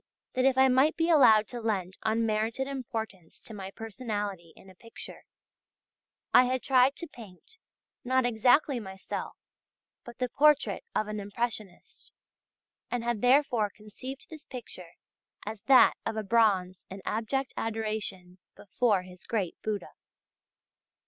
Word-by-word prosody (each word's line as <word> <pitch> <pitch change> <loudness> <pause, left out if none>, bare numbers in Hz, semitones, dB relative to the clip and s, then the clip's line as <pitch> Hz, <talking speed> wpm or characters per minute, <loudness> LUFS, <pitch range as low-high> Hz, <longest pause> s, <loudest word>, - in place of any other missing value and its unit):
that 255 0 +1
if 265 -1 +3
I 265 0 +6
might 265 +4 +3
be 330 +1 +2
allowed 225 -9 +6
to 240 -1 -6
lend 190 -5 -2
unmerited 225 +2 0
importance 225 -10 -6
to 225 - -11
my 195 -2 -7
personality 205 -5 -5
in - - -17
a 190 - -14
picture, 230 +5 -12 1.1
I 255 - +7
had 255 0 -1
tried 265 +1 +4
to 340 - -7
paint, 230 - -14 0.4
not 260 0 +2
exactly 245 +4 +3
myself, 190 -3 -6 0.7
but 240 0 -11
the 250 - -1
portrait 295 - +3
of 215 - 0
an 215 0 -4
impressionist, 205 -2 -5 0.8
and 245 -1 -2
had 235 -3 -1
therefore 250 -4 +3
conceived 220 +6 -10
this 310 -2 -10
picture 185 -9 -9 0.5
as 215 0 -6
that 265 -2 +7
of 220 - -3
a 220 - -2
bonze 195 -4 +2
in 195 0 -9
abject 255 +5 -2
adoration 215 -5 -3 0.2
before 205 -1 0
his 180 0 -14
great 200 -7 -2
Buddha. 215 -2 -4
225 Hz, 135 wpm, -29 LUFS, 205-255 Hz, 1.1 s, I